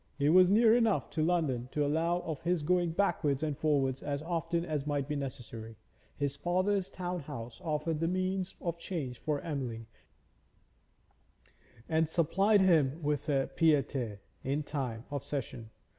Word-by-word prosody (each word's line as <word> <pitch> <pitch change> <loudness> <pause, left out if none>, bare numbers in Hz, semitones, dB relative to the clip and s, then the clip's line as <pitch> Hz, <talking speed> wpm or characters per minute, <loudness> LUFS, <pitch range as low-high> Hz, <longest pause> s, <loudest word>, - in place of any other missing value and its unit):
It 145 +1 +3
was 180 +1 +7
near 220 +2 +6
enough 210 - +2
to 160 - -1
London 150 -8 0
to 150 -1 +1
allow 165 +4 +1
of 160 -4 -5
his 170 -2 0
going 175 +2 +2
backwards 160 -5 +1
and 150 -2 -1
forwards 140 -3 +1
as 145 0 -3
often 170 0 -1
as 150 -3 -2
might 145 -2 -1
be 150 - -2
necessary; 120 -5 -6 0.4
his 140 -1 -1
father's 185 +5 0
town 180 -1 -4
house 135 -2 -8
offered 155 0 -1
the 165 - +1
means 185 +1 -1
of 170 -2 -3
change 145 -9 -4
for 150 -2 -1
Emily, 125 -8 -4 2.0
and 160 -1 +2
supplied 195 +6 +3
him 160 -4 +3
with 145 0 -1
a 135 -2 +1
pied 160 -2 +5
a 140 - +1
terre 115 -7 -4 0.2
in 140 +3 -1
time 130 -6 -4
of 140 -2 -3
session. 125 -5 -5
150 Hz, 160 wpm, -31 LUFS, 140-175 Hz, 2.0 s, was